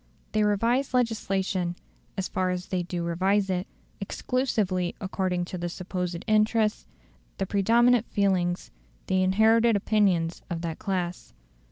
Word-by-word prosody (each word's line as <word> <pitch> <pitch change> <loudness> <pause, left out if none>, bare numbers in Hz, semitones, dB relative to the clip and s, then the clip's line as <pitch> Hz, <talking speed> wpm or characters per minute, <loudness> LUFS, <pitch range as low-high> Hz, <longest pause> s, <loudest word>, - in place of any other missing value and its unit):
They 215 - +1
revise 235 +6 +1
legislation, 195 -7 0 0.4
as 190 - -1
far 185 0 -1
as 180 0 -3
they 185 -1 0
do 175 0 -4
revise 190 +4 +1
it, 180 0 -2 0.3
exclusively 195 -5 -1
according 185 -3 -1
to 180 0 -6
the 175 0 -2
supposed 180 -1 -4
interests, 215 0 +2 0.5
the 195 - -1
predominant 230 +4 +3
feelings, 185 -3 0 0.3
the 185 0 +1
inherited 220 +4 +4
opinions, 195 -5 +1
of 170 -2 -3
that 165 -2 -4
class. 180 -3 -3
190 Hz, 130 wpm, -27 LUFS, 180-215 Hz, 0.5 s, inherited